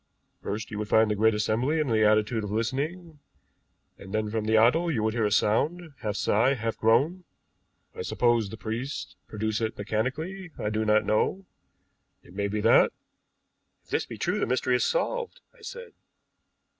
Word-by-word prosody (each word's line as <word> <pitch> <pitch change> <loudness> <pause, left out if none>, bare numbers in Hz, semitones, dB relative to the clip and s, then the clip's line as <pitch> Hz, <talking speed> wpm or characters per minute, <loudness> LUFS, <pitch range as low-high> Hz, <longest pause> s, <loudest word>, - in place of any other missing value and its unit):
First 105 +2 -5
you 105 - -4
would 105 - -3
find 110 0 +4
the - - +1
great 110 +1 +3
assembly 120 +9 0
in 155 - +1
the 110 -4 +2
attitude 110 +1 +2
of 105 - -4
listening, 145 - -3 0.8
and 95 - -11
then 110 0 -1
from 110 -1 -2
the 110 0 +3
idol 155 +10 +4
you 115 -8 -1
would 110 0 +1
hear 115 -2 +1
a - - -3
sound, 155 - +1
half 105 -3 -3
sigh, 115 +6 +2
half 115 -2 -3
groan. 150 +11 +2 0.7
I 460 - -6
suppose 120 - +1
the 110 - -8
priests 115 +6 -5
produce 110 +1 -2
it 110 -1 -2
mechanically 140 - -3
I 105 - -2
do 110 0 -1
not 105 0 +3
know. 185 - 0 0.8
It 90 - -17
may 100 +1 -1
be 105 +1 -2
that 115 +3 +5 0.5
" - - -50
"If - - -24
this - - 0
be - - -8
true - - -1
the - - 0
mystery 125 0 +1
is 125 - +1
solved," - - -1
I - - -23
said. 475 0 -8
115 Hz, 185 wpm, -27 LUFS, 110-150 Hz, 0.8 s, that